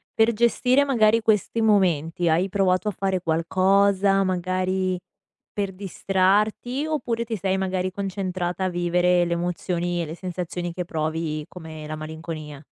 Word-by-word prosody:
per 225 +1 +4
gestire 250 +4 +3
magari 230 -4 +3
questi 215 +1 +1
momenti, 180 -5 +2
hai 175 +5 +2
provato 190 +1 +1
a - - +2
fare 190 -2 -1
qualcosa, 195 +4 +3
magari 185 0 -1 0.5
per 200 -2 -2
distrarti, 205 - 0
oppure 235 -7 -2
ti 225 -1 -3
sei 190 0 0
magari 185 -1 -1
concentrata 185 -2 -3
a - - +1
vivere 175 0 +2
le 170 - -1
emozioni 175 0 -2
e - - -2
le 160 +2 -7
sensazioni 175 -1 -4
che 180 - -3
provi 155 -1 -2
come 160 -3 -9
la 155 - -4
malinconia? 155 -2 -7
185 Hz, 140 wpm, -24 LUFS, 170-200 Hz, 0.5 s, per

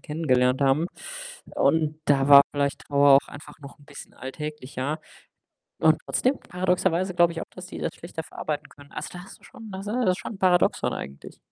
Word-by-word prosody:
kennengelernt 130 -5 +1
haben. 140 +5 +3 0.7
Und 155 -1 +1
da 140 -1 +3
war 140 -1 +10
vielleicht 140 -1 -1
Trauer 140 -1 +5
auch 140 - +3
einfach 145 +2 -12
noch 140 0 -12
'n 145 - -19
bisschen 140 -1 -12
alltäglicher. 150 +1 -5 0.8
Und 155 0 +4
trotzdem 260 +2 +1
paradoxerweise 180 0 0
glaube 175 -1 +4
ich 165 - -5
auch, - - -4
dass 185 -1 -10
die - - -9
das - - -3
schlechter 165 -1 -7
verarbeiten 150 -1 -5
können. 145 -1 -17
Also, - - -5
da 180 - -9
hast - - -13
du - - -21
schon 225 -3 -12
da 190 0 -6
s 200 - -9
das 230 -2 +1
ist 180 - -1
schon 210 - -7
Paradoxon 180 -2 +2
eigentlich. 70 0 -9
155 Hz, 195 wpm, -25 LUFS, 140-180 Hz, 0.8 s, war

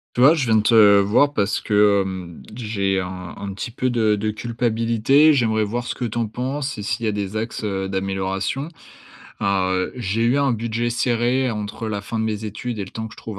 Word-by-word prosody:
Tu 125 - +1
vois, 145 +5 +8
je 145 -6 0
viens 110 -1 +4
te 105 -2 +6
voir 105 +9 +3
parce 100 -4 0
que, 105 -1 +3
hem, 95 -3 -6
j'ai 100 -5 -1
un 90 -1 -6
un 100 -1 -5
petit 100 - -5
peu 130 +2 -1
de 110 -3 +2
de 110 +1 -1
culpabilité. 115 +5 +2
J'aimerais 110 -5 +2
voir 120 +4 -3
ce - - -3
que 125 - -4
tu 115 0 -4
en 115 -1 0
penses 130 +5 -4
et - - -4
s'il 115 +2 -2
y - - +2
a - - 0
des 100 0 -3
axes, 115 0 -4
heu, 95 -2 -2
d'amélioration. 95 +7 -2 0.7
Alors, 95 -2 +1
heu, 95 0 -1
j'ai 115 -2 -2
eu 120 +4 +3
un 140 -1 +2
budget 115 +1 -2
serré 120 +2 +1
entre 105 +1 -5
la 105 -2 -3
fin 110 +3 -5
de 110 - 0
mes 110 -1 -3
études 110 +2 -5
et - - -2
le 95 - -12
temps 110 0 -5
que 110 - -11
je - - -25
trouve 110 -3 -7
110 Hz, 230 wpm, -21 LUFS, 100-120 Hz, 0.7 s, vois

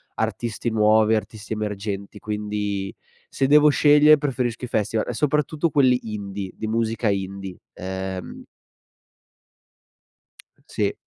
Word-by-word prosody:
artisti 120 0 -2
nuovi, 110 0 +4
artisti 110 0 -4
emergenti, 105 -1 -4
quindi 105 -2 -3 0.3
se 135 - -1
devo 150 +1 +6
scegliere 150 +1 +6
preferisco 125 -5 -2
i - - -2
festival, 110 -1 -1
e - - -2
soprattutto 150 +4 0
quelli 130 -4 +3
indie, 100 -2 -5
di 110 - -5
musica 115 0 0
indie, 95 -1 -4
ehm 95 0 -6 2.2
Sì. - - -1
110 Hz, 110 wpm, -23 LUFS, 100-125 Hz, 2.2 s, devo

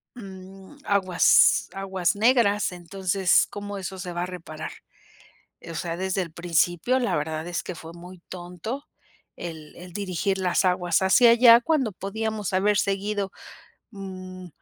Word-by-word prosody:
mm, 190 +1 -12
aguas 185 -3 +4
aguas 190 -2 -1
negras 210 -3 +3
entonces, 185 +1 +1
¿cómo 205 0 -6
eso 190 +1 -6
se 180 -1 -6
va 175 - -3
a - - -1
reparar? 160 -4 -7 0.9
Eh,o 165 0 -9
sea, 170 +1 -3
desde 190 0 -1
el 165 - -11
principio 175 +7 +1
la 245 - 0
verdad 155 +1 -3
es 175 -2 -2
que 180 - -6
fue 165 0 -10
muy 180 +2 -12
tonto 180 - -7 0.5
el 160 -3 -8
el 180 0 -11
dirigir 195 -1 -2
las 185 0 +1
aguas 180 -1 +1
hacia 230 +5 +6
allá 235 0 +7
cuando 275 -6 +1
podíamos 210 +1 -4
haber 205 +3 +2
seguido, 200 0 -1 0.6
mm, 185 -3 -9
190 Hz, 145 wpm, -25 LUFS, 175-205 Hz, 0.9 s, allá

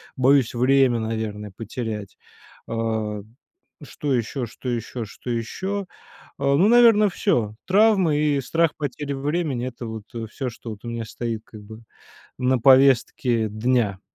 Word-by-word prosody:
Боюсь 130 -1 +3
время, 130 0 +3
наверное, 110 -2 -4
потерять. 110 -2 -5 0.5
А, 110 -2 -2 0.6
что 145 +1 -3
ещё, 125 +2 -1
что 115 +3 -7
ещё, 120 0 -3
что 120 +4 -7
ещё? 190 - -3 0.5
А, 140 0 +2
ну, 180 +8 +4
наверно, 225 -3 +6
всё. 110 - 0
Травмы, 195 -5 +4
и 145 -2 +1
страх 165 +4 +1
потери 145 0 -4
времени- 140 -2 -2
это 120 -1 -7
вот, 110 -1 -6
э, 115 -1 -4
всё, 130 +4 -4
что 115 - -10
вот 105 +2 -10
у - - -4
меня 115 -1 -4
стоит, 115 0 -4
как 110 - -12
бы, 110 +2 -11 0.6
на 130 0 +2
повестке 130 -3 +4
дня. 110 -2 0
125 Hz, 145 wpm, -23 LUFS, 110-140 Hz, 0.6 s, наверно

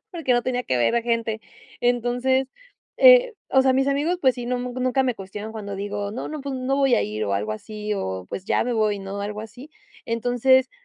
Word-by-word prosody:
porque 320 -7 0
no 240 0 +2
tenía 250 -1 -1
que 130 - -1
ver 120 - +2
a 235 - +1
gente. 230 -2 -1 0.4
Entonces, 245 +2 +1 0.5
eh, - - +7 0.2
o 265 0 +5
sea, 265 -1 +4
mis 270 +1 +2
amigos, 300 +6 0
pues 260 -2 +3
sí, 240 -1 -5
nu 250 0 -1
nunca 255 +1 0
me 250 -3 -1
cuestionan 205 +3 -7
cuando 205 -3 -6
digo: 205 +1 -4
"No, 250 - -5
no, 305 -2 -5
pues 275 -1 -4
no 260 +1 -1
voy 270 -2 +4
a - - +2
ir", 105 +1 -3
o 100 - -2
algo 105 +2 -2
así, 210 - -4
o: 95 - -4
"Pues 190 - -6
ya - - +1
me 245 - -2
voy, 215 -2 +1
¿no?", 195 +1 -6
algo 210 +1 -4
así. 245 +7 -11 0.3
Entonces, 245 +3 +2
240 Hz, 220 wpm, -23 LUFS, 205-260 Hz, 0.5 s, eh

